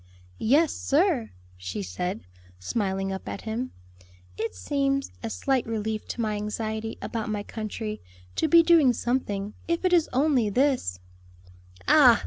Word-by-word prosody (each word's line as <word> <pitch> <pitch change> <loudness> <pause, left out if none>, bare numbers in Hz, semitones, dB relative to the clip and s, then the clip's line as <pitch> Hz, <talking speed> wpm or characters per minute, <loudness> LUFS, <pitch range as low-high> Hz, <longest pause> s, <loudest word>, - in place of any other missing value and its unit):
"Yes, 290 +7 +4
sir," 295 - +2 0.3
she 90 +2 -4
said, 180 - -3 0.4
smiling 195 - -1
up 190 - -6
at - - -5
him, 230 +3 -3 0.6
"it 225 - -3
seems 275 -1 0
a 230 - -3
slight 265 +2 0
relief 220 -1 -2
to 240 - -3
my 215 -2 0
anxiety 220 +1 -3
about 225 -2 -3
my 210 -1 -2
country, 215 0 -5 0.3
to - - +2
be 335 +2 +7
doing 325 -7 +6
something, 210 -5 -1
if 335 +2 0
it 365 - +3
is 335 -3 +4
only 260 -4 +3
this." 250 - +1 0.9
"Ah! - - +7
225 Hz, 140 wpm, -26 LUFS, 210-275 Hz, 0.9 s, be